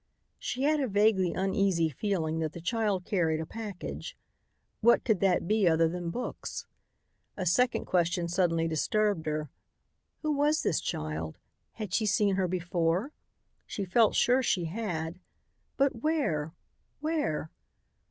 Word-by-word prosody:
She 260 - -3
had 300 +1 +3
a 270 - +1
vaguely 200 -3 +3
uneasy 190 -3 +2
feeling 160 - -1
that 160 -1 -2
the - - -7
child 200 0 0
carried 165 -5 +1
a 160 - -3
package. 210 -1 -6 0.6
What 235 +1 +5
could 220 -6 +2
that 185 -3 +2
be 210 -2 +3
other 165 0 +4
than 175 +1 -3
books? 245 +9 -5 0.7
A 185 - -2
second 250 +8 +2
question 175 -1 +1
suddenly 170 -2 +1
disturbed 170 +2 0
her: 155 -2 -2 0.7
Who 310 - +1
was 295 +1 +2
this 160 - +1
child? 80 +1 -4 0.4
Had 210 -5 -6
she 215 0 +2
seen 205 0 +3
her 190 -1 +1
before? 175 - 0 0.6
She 200 - -3
felt 220 +4 +3
sure 250 +2 +4
she 185 -8 +1
had. 170 -3 -3 0.6
But 275 -3 +2
where? 180 - 0 0.4
Where? 295 - -1
185 Hz, 140 wpm, -29 LUFS, 165-220 Hz, 0.7 s, What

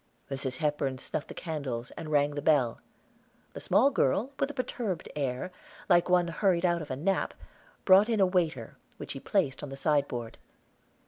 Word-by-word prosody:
Mrs. 135 -1 -2
Hepburn 145 -3 -1
snuffed 145 +3 -5
the - - -9
candles, 135 -8 -4
and 160 - -7
rang 145 -1 +3
the 145 0 -4
bell. 135 -6 +2 0.7
The - - -6
small 275 +5 +3
girl, 225 - +1
with 275 - +1
a - - -6
perturbed 225 -8 -3
air, 140 +4 -2 0.4
like 175 -1 +4
one 180 -1 +4
hurried 180 0 +1
out 170 -1 +2
of 150 - -8
a 130 - -2
nap, 190 +8 -1 0.5
brought 195 +4 +7
in 225 -2 +1
a 195 - +6
waiter, 165 - -1 0.2
which - - -7
she 135 - -5
placed 150 -5 0
on 145 - -6
the 135 - -6
sideboard. 140 -6 -1
155 Hz, 180 wpm, -29 LUFS, 135-185 Hz, 0.7 s, brought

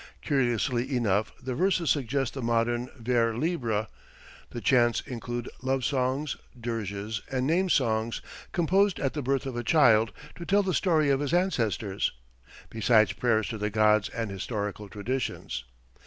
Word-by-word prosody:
Curiously 125 -1 0
enough 105 -2 +1
the 130 0 -4
verses 175 -1 +2
suggest 135 -2 0
the 135 - -5
modern 120 +1 0
vers 115 -1 +1
libre. 120 -9 -1 0.6
The 120 - -6
chants 120 -1 +3
include 120 0 -5
love 130 -1 0
songs, 135 +2 0 0.2
dirges 110 -2 -3
and 130 -1 0
name 180 +6 +2
songs 115 -6 +1 0.3
composed 190 +2 +2
at 135 - -1
the 150 - -3
birth 135 +1 0
of 130 -3 -4
a 120 - -2
child 115 -6 +5 0.3
to 175 - -7
tell 200 +3 +3
the 190 -1 -1
story 155 -5 +3
of 135 - +2
his 145 +3 0
ancestors 115 - 0 0.6
besides 110 -1 +3
prayers 110 -4 +1
to 110 - -5
the 105 0 -1
gods 105 0 +3
and 115 -3 -4
historical 105 +1 -4
traditions. 105 - -3
120 Hz, 150 wpm, -28 LUFS, 110-140 Hz, 0.6 s, child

